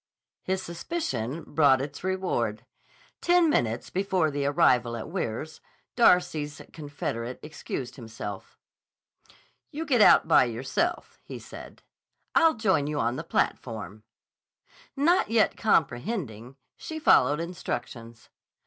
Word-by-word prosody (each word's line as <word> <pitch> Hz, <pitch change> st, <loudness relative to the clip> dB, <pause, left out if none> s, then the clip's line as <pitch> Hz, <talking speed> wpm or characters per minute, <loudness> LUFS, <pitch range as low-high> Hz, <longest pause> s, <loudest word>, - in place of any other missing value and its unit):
His 190 Hz, 0 st, -2 dB
suspicion 165 Hz, -, -4 dB
brought 140 Hz, -4 st, +3 dB
its 145 Hz, +4 st, -6 dB
reward. 185 Hz, -, -2 dB, 0.6 s
Ten 350 Hz, -2 st, +4 dB
minutes 115 Hz, -, -1 dB
before 185 Hz, -4 st, 0 dB
the 140 Hz, 0 st, -1 dB
arrival 125 Hz, -6 st, +2 dB
at 115 Hz, -, -7 dB
Weirs, 155 Hz, -, -4 dB, 0.3 s
Darcy's 175 Hz, -, +2 dB
confederate 130 Hz, -5 st, -5 dB
excused 135 Hz, -4 st, -6 dB
himself. 110 Hz, -4 st, -8 dB, 1.1 s
"You 315 Hz, +3 st, -5 dB
get 255 Hz, -7 st, +2 dB
out 205 Hz, -, +6 dB
by 155 Hz, -, +5 dB
yourself," 130 Hz, -, -3 dB
he -, -, -8 dB
said. -, -, -12 dB, 0.5 s
"I'll 325 Hz, -3 st, +4 dB
join 190 Hz, -11 st, +1 dB
you 150 Hz, -1 st, -2 dB
on 120 Hz, +2 st, 0 dB
the -, -, -5 dB
platform." 110 Hz, -3 st, -3 dB, 0.9 s
Not 310 Hz, -, +2 dB
yet 225 Hz, -1 st, +2 dB
comprehending, 135 Hz, -, -1 dB, 0.2 s
she 315 Hz, -, -7 dB
followed 145 Hz, -, +4 dB
instructions. 120 Hz, -9 st, -6 dB
150 Hz, 115 wpm, -27 LUFS, 120-190 Hz, 1.1 s, out